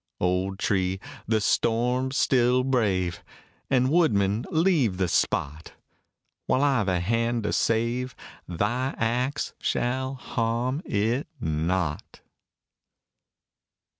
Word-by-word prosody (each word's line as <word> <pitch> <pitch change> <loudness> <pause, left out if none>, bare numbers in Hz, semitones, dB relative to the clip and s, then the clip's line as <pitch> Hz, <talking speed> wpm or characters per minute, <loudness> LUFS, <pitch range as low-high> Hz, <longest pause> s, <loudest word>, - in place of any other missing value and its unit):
Old 90 +2 0
tree! 95 -1 0 0.3
the 110 0 +2
storm 125 +4 +1
still 125 -2 +3
brave! 100 -10 0 0.5
And, 130 0 +2
woodman, 110 - +2
leave 155 - +2
the 95 -1 +1
spot; 80 -1 -1 0.7
While 130 - +2
I've 135 -8 +2
a 90 -2 +1
hand 115 +5 0
to 105 - -1
save, 120 +3 0 0.3
thy 115 +10 -1
axe 125 +5 -1
shall 130 +2 -1
harm 120 +3 -2
it 115 +7 0
not. 80 0 -2
115 Hz, 100 wpm, -26 LUFS, 95-130 Hz, 0.7 s, still